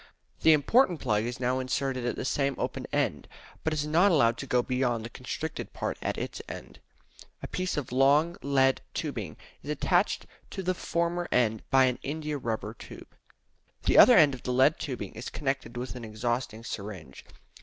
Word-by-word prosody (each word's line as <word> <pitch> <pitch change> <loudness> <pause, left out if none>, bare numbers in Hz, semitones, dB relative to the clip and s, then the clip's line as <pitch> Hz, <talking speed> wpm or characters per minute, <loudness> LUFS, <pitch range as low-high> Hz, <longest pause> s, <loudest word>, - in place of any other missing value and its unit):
The 160 - +7
important 175 - +3
plug 110 -3 0
is 120 +1 -4
now 130 +1 0
inserted 130 -1 -1
at 120 - -1
the - - -4
same 140 0 0
open - - -3
end, - - -1 0.4
but 160 - 0
is 150 -1 -1
not 170 +6 +4
allowed 120 -8 +4
to 140 - -5
go 125 -1 +2
beyond 125 -3 -1
the 115 - -8
constricted - - -5
part - - -3
at - - -2
its - - -5
end. - - -9 0.6
A - - -3
piece 185 -2 -3
of 140 -5 -3
long 145 +6 +4
lead 135 -1 +2
tubing 115 - -4 0.2
is - - -9
attached - - +1 0.2
to 190 - -5
the 185 +1 +1
former 170 0 -1
end 110 -3 +2
by 135 0 +5
an 125 -1 0
india 150 0 -3
rubber 110 -3 -3
tube. - - -12 0.7
The - - +5
other 250 - +9
end 150 -5 +6
of 130 - -7
the 125 - -3
lead 135 +5 +4
tubing 125 -9 -5
is 115 - -6
connected 135 -4 -3
with 125 +1 -5
an 125 - -7
exhausting 115 +1 -3
syringe. 100 - -7
130 Hz, 185 wpm, -28 LUFS, 120-150 Hz, 0.7 s, other